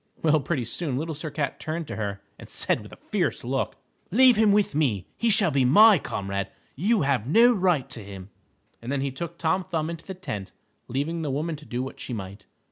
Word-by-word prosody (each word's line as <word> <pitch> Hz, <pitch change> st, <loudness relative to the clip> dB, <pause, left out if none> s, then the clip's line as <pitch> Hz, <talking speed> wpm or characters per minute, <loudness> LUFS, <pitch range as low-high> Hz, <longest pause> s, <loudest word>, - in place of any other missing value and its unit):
Well, 155 Hz, -1 st, +4 dB
pretty 140 Hz, -3 st, -2 dB
soon 130 Hz, +3 st, -2 dB
Little 160 Hz, +3 st, -3 dB
Sir 155 Hz, +1 st, -5 dB
Cat 145 Hz, -2 st, -3 dB
turned 160 Hz, +1 st, -4 dB
to -, -, -6 dB
her 100 Hz, -2 st, -4 dB, 0.2 s
and -, -, -12 dB
said -, -, 0 dB
with -, -, -12 dB
a -, -, -10 dB, 0.2 s
fierce -, -, 0 dB
look, -, -, -2 dB, 0.3 s
"Leave 250 Hz, +4 st, +6 dB
him 215 Hz, -1 st, +4 dB
with 205 Hz, -3 st, +2 dB
me. 125 Hz, -, 0 dB
He 230 Hz, -, +1 dB
shall 200 Hz, -5 st, +3 dB
be 135 Hz, -2 st, +2 dB
my 205 Hz, -, +7 dB
comrade. 100 Hz, -5 st, -3 dB, 0.3 s
You 200 Hz, -, +2 dB
have 135 Hz, -5 st, 0 dB
no 235 Hz, -, +6 dB
right 180 Hz, -, +1 dB
to 115 Hz, -4 st, -5 dB
him," 95 Hz, -1 st, -10 dB, 0.5 s
and 120 Hz, +3 st, -5 dB
then 140 Hz, -1 st, 0 dB
he 135 Hz, 0 st, -1 dB
took 170 Hz, +5 st, -6 dB
Tom 185 Hz, +3 st, +1 dB
Thumb 160 Hz, -2 st, -2 dB
into 165 Hz, -1 st, -9 dB
the 190 Hz, -, -5 dB
tent, 105 Hz, -, -6 dB, 0.3 s
leaving 150 Hz, +6 st, -2 dB
the 155 Hz, -, -2 dB
woman 155 Hz, +4 st, -2 dB
to 150 Hz, 0 st, -13 dB
do 125 Hz, +1 st, -2 dB
what 135 Hz, -, -8 dB
she 125 Hz, -, -6 dB
might. 100 Hz, -2 st, -7 dB
150 Hz, 220 wpm, -26 LUFS, 125-175 Hz, 0.5 s, my